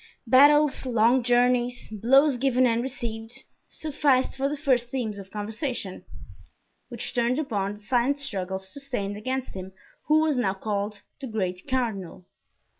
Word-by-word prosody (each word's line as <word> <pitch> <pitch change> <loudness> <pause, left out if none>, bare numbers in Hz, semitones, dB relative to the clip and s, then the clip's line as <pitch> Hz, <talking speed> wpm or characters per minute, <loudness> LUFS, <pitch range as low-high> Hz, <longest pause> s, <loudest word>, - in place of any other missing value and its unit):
Battles, 285 +3 +5
long 235 +1 +3
journeys, 245 0 +2
blows 265 +6 +4
given 255 0 +2
and 230 -1 +2
received, 240 -1 -6 0.3
sufficed 280 -4 +1
for 270 +1 0
the 295 - -3
first 255 -5 +1
themes 225 -6 -3
of 195 -1 -10
conversation, 215 - -4 0.8
which - - -5
turned 245 +1 +1
upon 205 -10 -2
the 205 - -12
silent 245 +5 +1
struggles 190 -8 -4
sustained 245 -8 -3
against 260 +5 -4
him 190 0 -8 0.3
who 310 +1 +5
was 310 -4 +1
now 195 -6 +1
called 205 +1 -3 0.2
the 270 - -6
great 185 -4 -3
cardinal. 220 -10 -2
245 Hz, 140 wpm, -26 LUFS, 210-270 Hz, 0.8 s, Battles